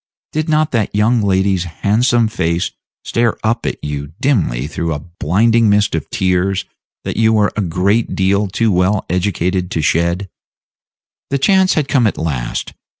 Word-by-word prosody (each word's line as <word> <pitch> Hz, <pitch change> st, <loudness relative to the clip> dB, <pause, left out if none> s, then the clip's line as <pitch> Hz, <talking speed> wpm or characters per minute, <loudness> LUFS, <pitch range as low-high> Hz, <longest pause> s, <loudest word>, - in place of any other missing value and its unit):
Did 155 Hz, +1 st, -2 dB
not 155 Hz, 0 st, +2 dB
that 115 Hz, -4 st, -1 dB
young 110 Hz, +3 st, +3 dB
lady's 95 Hz, -2 st, +1 dB
handsome 110 Hz, -, +1 dB
face 85 Hz, -6 st, -1 dB, 0.3 s
stare 120 Hz, -1 st, 0 dB
up 115 Hz, +1 st, 0 dB
at -, -, -2 dB
you 75 Hz, 0 st, -5 dB
dimly 90 Hz, -, 0 dB
through 80 Hz, +1 st, -3 dB
a -, -, -4 dB, 0.2 s
blinding 110 Hz, +7 st, +3 dB
mist 105 Hz, +1 st, +2 dB
of 80 Hz, -2 st, -3 dB
tears 95 Hz, +1 st, 0 dB, 0.4 s
that -, -, -4 dB
you 110 Hz, 0 st, +3 dB
were 105 Hz, -1 st, +2 dB
a 105 Hz, -, -1 dB
great 100 Hz, +5 st, 0 dB
deal 100 Hz, +2 st, +1 dB
too 110 Hz, +3 st, 0 dB
well 95 Hz, +2 st, +1 dB
educated 90 Hz, 0 st, -1 dB
to 80 Hz, -, -2 dB
shed? 85 Hz, +5 st, +1 dB, 1.0 s
The 140 Hz, -, 0 dB
chance 190 Hz, +6 st, +3 dB
had 150 Hz, -3 st, 0 dB
come 130 Hz, -6 st, +3 dB
at -, -, -2 dB
last. 70 Hz, -7 st, -3 dB
100 Hz, 160 wpm, -17 LUFS, 85-115 Hz, 1.0 s, young